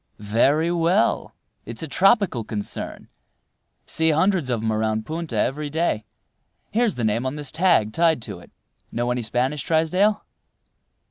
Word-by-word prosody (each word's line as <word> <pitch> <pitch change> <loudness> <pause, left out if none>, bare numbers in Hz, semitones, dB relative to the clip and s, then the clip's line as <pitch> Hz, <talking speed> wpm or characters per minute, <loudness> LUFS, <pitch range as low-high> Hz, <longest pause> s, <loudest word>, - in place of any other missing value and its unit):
"Very 135 +11 +2
well. 170 -6 +1 0.3
It's 115 +6 -5
a - - -3
tropical 195 - +3
concern. 105 -1 -5 0.8
See 160 0 +1
hundreds 165 -2 +2
of 115 -3 -1
'em 110 -1 0
around 110 0 -1
Punta 160 -4 -4
every 145 +7 -1
day. 155 -9 -1 0.7
Here's 230 -2 +1
the 120 - -3
name 110 +2 +1
on 130 +2 -2
this 145 -2 -4
tag 160 - +2
tied 165 -3 +3
to - - -5
it. - - -16 0.4
Know 120 +1 -1
any 125 0 -1
Spanish, 130 +5 -1
Trysdale?" 180 +8 +1
145 Hz, 145 wpm, -23 LUFS, 115-170 Hz, 0.8 s, tropical